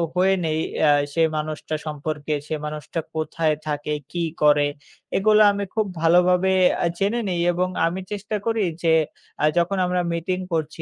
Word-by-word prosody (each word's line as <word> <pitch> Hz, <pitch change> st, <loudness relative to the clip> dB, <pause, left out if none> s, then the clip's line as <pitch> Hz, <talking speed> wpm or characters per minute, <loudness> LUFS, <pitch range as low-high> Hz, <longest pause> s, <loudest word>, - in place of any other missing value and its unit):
হয়ে 190 Hz, +1 st, +4 dB
নেই 155 Hz, 0 st, 0 dB, 0.2 s
অ্যা 150 Hz, -2 st, +5 dB, 0.2 s
সে 165 Hz, -, +1 dB, 0.2 s
মানুষটা 155 Hz, 0 st, -3 dB
সম্পর্কে। 150 Hz, 0 st, -3 dB
সে -, -, -3 dB
মানুষটা 150 Hz, +2 st, -5 dB, 0.2 s
কোথায় 155 Hz, 0 st, 0 dB
থাকে, 150 Hz, 0 st, -2 dB, 0.2 s
কি 175 Hz, -1 st, -2 dB, 0.2 s
করে 145 Hz, -1 st, +5 dB, 0.5 s
এগুলা 215 Hz, +2 st, +5 dB
আমি 200 Hz, 0 st, -2 dB
খুব 215 Hz, -1 st, +2 dB, 0.2 s
ভালোভাবে 180 Hz, +2 st, +4 dB, 0.3 s
অ্যা 170 Hz, -, +2 dB
জেনে 205 Hz, +5 st, +1 dB
নেই 175 Hz, -1 st, -1 dB
এবং 180 Hz, +1 st, 0 dB, 0.2 s
আমি 175 Hz, +3 st, -1 dB
চেষ্টা 210 Hz, +1 st, -4 dB
করি 225 Hz, -1 st, +1 dB, 0.2 s
যে 165 Hz, -1 st, +4 dB, 0.5 s
আ -, -, +6 dB
যখন 180 Hz, +3 st, +1 dB
আমরা 180 Hz, 0 st, 0 dB
মিটিং 180 Hz, +2 st, -2 dB
করছি 160 Hz, 0 st, -2 dB
170 Hz, 160 wpm, -23 LUFS, 155-190 Hz, 0.5 s, আ